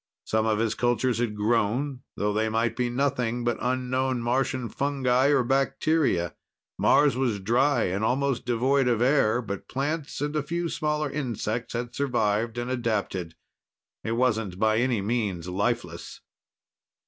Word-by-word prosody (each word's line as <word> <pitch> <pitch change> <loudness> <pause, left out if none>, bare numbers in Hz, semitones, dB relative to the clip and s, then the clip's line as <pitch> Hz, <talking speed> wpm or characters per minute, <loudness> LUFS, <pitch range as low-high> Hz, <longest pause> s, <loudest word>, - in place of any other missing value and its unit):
Some 110 0 +1
of 110 -1 +2
his 110 0 +1
cultures 120 0 +1
had 115 -3 -1
grown, 120 +5 0 0.2
though 105 0 0
they 110 +1 +1
might 115 +1 0
be 125 -1 0
nothing 125 -2 0
but 120 -1 0
unknown 130 0 0
Martian 130 +1 0
fungi 135 -1 +1
or 140 -3 +3
bacteria. 135 - +1 0.5
Mars 145 -2 +4
was 125 -5 0
dry 120 +5 +2
and 95 +4 -1
almost 130 +1 0
devoid 125 +2 +2
of 120 -3 +2
air, 125 -2 +3
but 100 -2 -6
plants 145 +2 -3
and 145 +1 -2
a 150 - +2
few 170 +4 -2
smaller 150 -2 -1
insects 120 -4 -3
had 120 0 -4
survived 115 -4 0
and 120 +1 -3
adapted. 105 -8 -2 0.7
It 110 - -2
wasn't 110 -6 0
by 110 +2 +2
any 120 -4 +1
means 100 -6 -1
lifeless. 90 -2 -3
120 Hz, 150 wpm, -26 LUFS, 110-135 Hz, 0.7 s, Mars